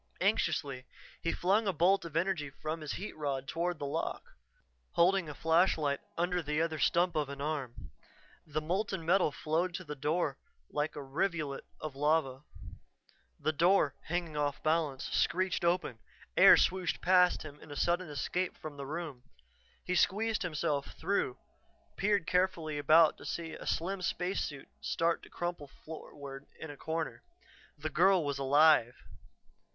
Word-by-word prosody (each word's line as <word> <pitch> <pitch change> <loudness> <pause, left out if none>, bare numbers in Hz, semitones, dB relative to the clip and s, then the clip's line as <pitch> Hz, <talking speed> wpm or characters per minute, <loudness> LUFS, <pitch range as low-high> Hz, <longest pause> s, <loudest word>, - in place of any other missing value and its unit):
Anxiously 145 -9 0 0.4
he 165 - 0
flung 200 +4 +2
a 195 - +2
bolt 175 +3 +3
of 165 -1 -4
energy 165 -4 0
from 155 +4 -5
his 150 - -4
heat 200 +4 -6
rod 140 -3 -3
toward 175 +2 -1
the 145 - -4
lock, 140 - -3 0.7
holding 180 -1 +3
a 145 - -7
flashlight 160 -4 +2 0.2
under 175 +1 +1
the 150 -1 -1
other 160 -1 0
stump 175 +3 +2
of 150 -3 0
an 140 0 -7
arm. 140 -5 -4 0.6
The 155 0 -2
molten 185 +2 -2
metal 175 -2 +3
flowed 165 +5 -1
to 185 - -5
the 150 -4 -6
floor 150 +5 -1 0.3
like 150 +1 -1
a 145 - -5
rivulet 150 0 -2
of 155 -3 -6
lava. 145 -2 +1 1.0
The 155 - +1
door, 170 -1 +4
hanging 170 -2 -2
off 145 -1 -1
balance, 155 -4 +1
screeched 185 0 +1
open; 170 -9 0 0.4
air - - +9
swooshed 180 -7 +1
past 180 0 +4
him 150 -1 -10
in - - -14
its 145 - -1
sudden 175 0 0
escape 180 +5 -2
from 150 -2 -8
the 140 -1 -6
room. 155 -4 -5 0.6
He 180 - -1
squeezed 215 +5 +2
himself 150 -4 -2
through, 170 -7 0 0.6
peered 200 -3 +1
carefully 170 -5 0
about 155 +3 +5
to - - -11
see 165 -1 -4
a - - -8
slim 185 +3 -1
spacesuit 170 -5 -2
start 165 0 0
to - - -14
crumple 175 -4 -4 0.2
floorward 140 -3 -9
in 160 - -6
a - - -9
corner. 160 +2 -4 0.6
The 155 +1 -4
girl 180 +1 +4
was 140 -1 -2
alive! 140 -3 +5
160 Hz, 155 wpm, -32 LUFS, 145-180 Hz, 1.0 s, air